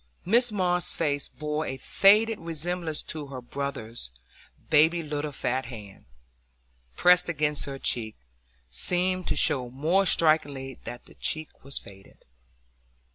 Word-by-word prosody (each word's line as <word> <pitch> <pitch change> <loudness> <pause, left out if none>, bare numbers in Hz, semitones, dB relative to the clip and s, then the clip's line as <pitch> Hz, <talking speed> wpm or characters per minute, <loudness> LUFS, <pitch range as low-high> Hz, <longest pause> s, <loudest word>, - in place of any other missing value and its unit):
Mrs 235 +4 +4
Moss's 180 -3 +1
face 145 -3 -1
bore 150 +1 -4
a 130 - -4
faded 210 - +4
resemblance 165 0 -3
to 150 -2 -5
her 135 -2 -7
brother's; 120 - -5 0.6
baby's 160 +2 +4
little 150 0 -3
fat 130 -1 -2
hand, 105 -5 -11 0.9
pressed 180 0 +4
against 150 -2 -1
her 140 -1 -6
cheek, 110 -4 +1 0.5
seemed 180 - -1
to - - 0
show 130 -3 +3
more 165 +10 +1
strikingly 145 -6 +2
that 120 - -8
the - - -17
cheek 155 -1 -3
was 140 +1 -3
faded. 95 -1 -11
150 Hz, 130 wpm, -27 LUFS, 130-175 Hz, 0.9 s, Mrs